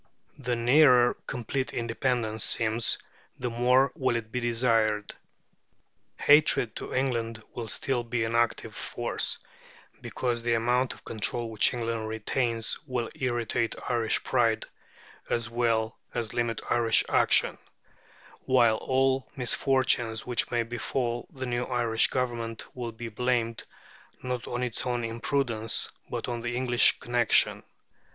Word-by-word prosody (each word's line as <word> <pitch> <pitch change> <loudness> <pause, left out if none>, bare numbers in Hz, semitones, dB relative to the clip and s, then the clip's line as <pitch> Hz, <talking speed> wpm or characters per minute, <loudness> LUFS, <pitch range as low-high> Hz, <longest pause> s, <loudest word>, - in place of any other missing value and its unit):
The 125 -2 -1
nearer 125 0 +5
complete 130 +1 -3
independence 115 -2 0
seems, 115 0 +3 0.4
the 125 -1 -3
more 125 +3 +3
will 130 -6 0
it 110 -1 -4
be 125 - -2
desired. 115 -3 +1 1.0
Hatred 145 -6 +4
to - - -7
England 115 -4 -1
will 120 -2 -5
still 125 +2 -2
be 115 -1 -2
an 115 +1 -2
active 120 -1 0
force, - - -1 0.6
because 120 -2 -2
the 120 0 +1
amount 125 +3 +1
of - - -20
control 115 +1 -1
which 110 - +3
England 115 -2 -3
retains 115 +1 -1
will 125 -3 -3
irritate 120 -2 -1
Irish 115 -2 +1
pride, - - +1 0.6
as 120 0 -1
well 115 -2 0 0.2
as 115 -3 -2
limit 120 -1 -1
Irish 115 -2 +3
action; - - +3 0.9
while 120 -4 +4
all 130 +1 +1
the - - -28
misfortunes 125 -3 +2
which 120 -2 +1
may 120 -1 0
befall 120 +1 -3
the 130 -1 -6
new 120 0 -1
Irish 120 -3 +2
Government 120 -3 -3
will 120 -2 -4
be 115 +1 -7
blamed, 115 0 -1 0.6
not 125 -1 -4
on 120 +1 -3
its 125 -3 -2
own 120 -1 -2
imprudence, 115 -1 -1 0.2
but - - -4
on 120 -1 -3
the 120 +1 -3
English 125 -1 +3
connection. 120 -2 +3
120 Hz, 130 wpm, -27 LUFS, 115-125 Hz, 1.0 s, nearer